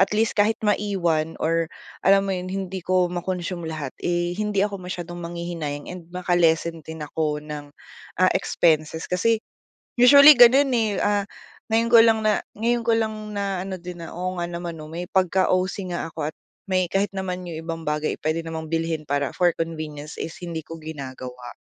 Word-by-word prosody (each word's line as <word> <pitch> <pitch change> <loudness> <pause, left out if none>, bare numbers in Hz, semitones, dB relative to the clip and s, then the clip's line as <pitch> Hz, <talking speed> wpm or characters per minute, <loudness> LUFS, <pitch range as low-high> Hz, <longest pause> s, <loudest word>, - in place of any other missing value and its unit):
at 195 +2 +3
least 225 +1 +2
kahit 210 +1 +2
maiwan 180 -6 0
or 165 0 0 0.3
alam 195 0 +5
mo 195 - -1
'yon 185 0 -3
hindi 190 -1 -4
ko 180 0 +1
ma-consume 175 -1 -3
lahat 155 -4 -5
eh, 175 0 0
hindi 210 -2 +1
ako 200 -2 -4
masyadong 175 -1 -6
manghihinayang 170 -4 -5
and 175 -2 -10
maka-lessen 170 -2 +1
din 160 0 -7
ako 150 -1 -2
ng, 150 -1 -7 0.5
ah, 185 +1 +4
expenses 160 -1 +1
kasi 220 +6 +2 0.7
usually 280 +4 +10
gano'n, 260 +2 +7
eh, 220 -4 +1
ah, 205 -1 +1 0.4
ngayon 230 +1 +2
ko 235 - +9
lang 225 -1 +5
na 215 -1 +3 0.2
ngayon 235 +3 +1
ko 230 0 +1
lang 220 -1 0 0.2
naano 195 -1 -2
din, 180 -1 -8
na 165 - -8
oo 185 +1 -3
nga 175 - -1
naman 170 -1 -6
no 155 - -8
may 170 +3 -5
pagka-OC 185 0 +1
nga 170 -1 -3
'ko - - -3
at - - -47 0.3
may 185 -2 +1
kahit 195 +3 0
naman 185 -2 -4
'yong 165 -2 -6
ibang 165 0 -4
bagay 150 0 -1
ay - - -30
pwede 155 +1 0
namang 160 0 -6
bilhin 165 -1 -1
para 145 -1 -1
for 175 -1 +4
convenience 155 -3 -5
is 165 - -5
hindi 170 -3 -5
ko 165 +2 -9
ginagawa. 130 -5 -8
175 Hz, 180 wpm, -24 LUFS, 160-195 Hz, 0.7 s, usually